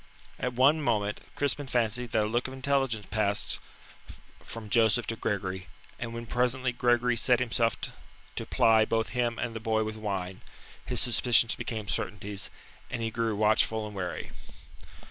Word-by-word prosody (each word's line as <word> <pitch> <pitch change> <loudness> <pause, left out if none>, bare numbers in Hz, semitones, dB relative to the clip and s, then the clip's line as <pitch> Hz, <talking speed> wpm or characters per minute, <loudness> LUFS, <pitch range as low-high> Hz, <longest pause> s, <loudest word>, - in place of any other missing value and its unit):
At 125 0 -1
one 140 +6 +4
moment 105 -6 0
Crispin 145 0 0
fancied 120 -1 0
that 110 - +3
a - - 0
look 120 +4 0
of 130 - -8
intelligence 135 -5 0
passed 105 -1 +1 0.8
from 115 -2 -8
Joseph 115 +1 +4
to 115 - -2
Gregory, 95 -4 -3 0.3
and 115 -1 -4
when 115 0 -6
presently 125 +2 +1
Gregory 120 0 +2
set 120 +1 +3
himself 115 -2 +1 0.6
to - - -3
ply 110 -1 +5
both 110 0 0
him 120 -2 0
and 115 -2 -3
the - - -3
boy 110 0 +1
with 110 0 -4
wine, 95 -3 -4 0.4
his - - -1
suspicions 120 -1 +4
became 110 -3 -4
certainties, 100 +1 -3 0.4
and 115 -2 -3
he 115 - -1
grew 115 -1 -1
watchful 110 +1 +2
and 105 -1 -8
wary. 90 -2 -4
115 Hz, 160 wpm, -29 LUFS, 105-125 Hz, 0.8 s, ply